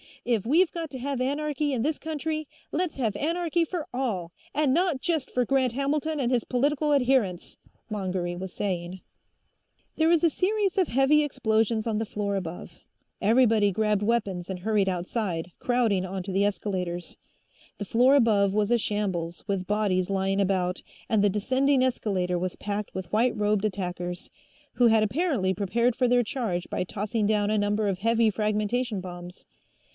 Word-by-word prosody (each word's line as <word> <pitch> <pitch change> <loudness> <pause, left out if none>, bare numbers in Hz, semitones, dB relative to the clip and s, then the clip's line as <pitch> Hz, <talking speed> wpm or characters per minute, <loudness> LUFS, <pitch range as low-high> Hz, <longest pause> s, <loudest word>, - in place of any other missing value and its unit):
If 230 -5 0
we've 320 +6 +3
got 330 -2 -5
to 260 - -6
have 275 0 -3
anarchy 290 +1 -1
in 245 - -1
this 305 +2 -1
country, 310 -1 -3 0.2
let's 350 0 -1
have 225 -6 -1
anarchy 335 +5 0
for 330 -2 -4
all, 210 -10 -2 0.2
and 290 -2 +2
not 345 -3 +1
just 320 -3 -1
for 250 -1 +1
Grant 260 -2 +1
Hamilton 295 +3 -1
and 250 -2 0
his 245 -2 +2
political 290 +4 +1
adherents!" 250 -10 +1 0.3
Mongery 185 -4 -2
was 185 +1 -6
saying. 180 -2 -3 1.0
There 320 - +3
was 335 -1 +3
a 335 - +6
series 395 +3 0
of 370 -4 +3
heavy 270 +5 +4
explosions 225 -5 0
on 220 -2 -1
the 225 - -1
floor 205 -1 -2
above. 180 -3 -6 0.4
Everybody 220 -2 +4
grabbed 210 +1 +1
weapons 205 -6 -1
and 190 -1 -4
hurried 205 0 +1
outside, 180 -1 -3
crowding 230 -7 +1
onto 190 +1 -5
the 195 +2 +2
escalators. 180 -4 -3 0.6
The 205 - -5
floor 250 +7 +4
above 210 -7 +3
was 210 +1 +1
a 240 - +5
shambles, 185 -6 -2
with 195 -3 -2
bodies 200 -3 +1
lying 195 0 +1
about, 185 -2 0 0.3
and 215 -2 +3
the 205 - +4
descending 260 +6 +2
escalator 185 -8 0
was 185 0 -3
packed 205 0 -4
with 185 -2 -5
white 235 +3 +3
robed 210 -1 +1
attackers, 180 -3 -4 0.4
who 245 - +4
had 220 -1 +4
apparently 225 - 0
prepared 225 +5 0
for 250 - +2
their 245 0 +3
charge 210 -7 -3
by - - -1
tossing 210 +3 -2
down 210 -1 +1
a 215 - +2
number 205 +1 +1
of 190 -2 -1
heavy 230 +1 +3
fragmentation 215 +2 -1
bombs. 180 -1 -9
215 Hz, 170 wpm, -26 LUFS, 195-265 Hz, 1.0 s, a